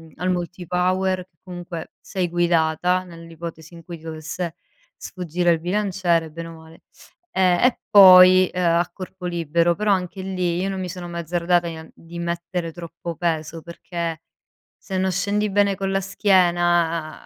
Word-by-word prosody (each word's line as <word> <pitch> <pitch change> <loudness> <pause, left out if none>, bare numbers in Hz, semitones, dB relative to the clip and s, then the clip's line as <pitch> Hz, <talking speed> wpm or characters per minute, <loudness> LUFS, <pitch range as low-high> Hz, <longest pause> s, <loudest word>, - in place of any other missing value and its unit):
al 180 +3 -2
Multipower, 180 +1 -1
che 165 -3 -48
comunque 175 -2 -8
sei 185 -2 -3
guidata, 175 +1 +1
nell'ipotesi 165 -1 -10
in 170 - -12
cui 170 +1 -8
ti 160 - -20
dovesse 160 +2 -5 0.4
sfuggire 175 -1 -1
il 165 - +1
bilanciere, 180 -3 0
bene 165 +1 -7
o 165 - -10
male. 160 0 -16 0.5
E 190 - -1 0.2
e 250 - +2
poi, 185 -2 +8
ehm, 180 - -1 0.2
a 175 0 -1
corpo 185 -1 -9
libero, 170 0 +1
però 210 +2 0
anche 185 0 -1
lì 180 -2 -2
io 195 - -1
non 190 -1 -4
mi 185 -1 -4
sono 180 -1 -7
mai 170 0 -4
azzardata 175 +1 0
di 165 - -5
en 160 0 -11
di 170 +1 -10
mettere 170 0 -3
troppo 170 0 -8
peso, 165 -1 -2
perché 170 -1 -5 0.6
se 190 -2 -3
non 190 0 +1
scendi 205 +3 0
bene 200 -1 +2
con 195 0 -2
la 195 - +1
schiena, 175 -5 +1
175 Hz, 165 wpm, -22 LUFS, 165-185 Hz, 0.6 s, poi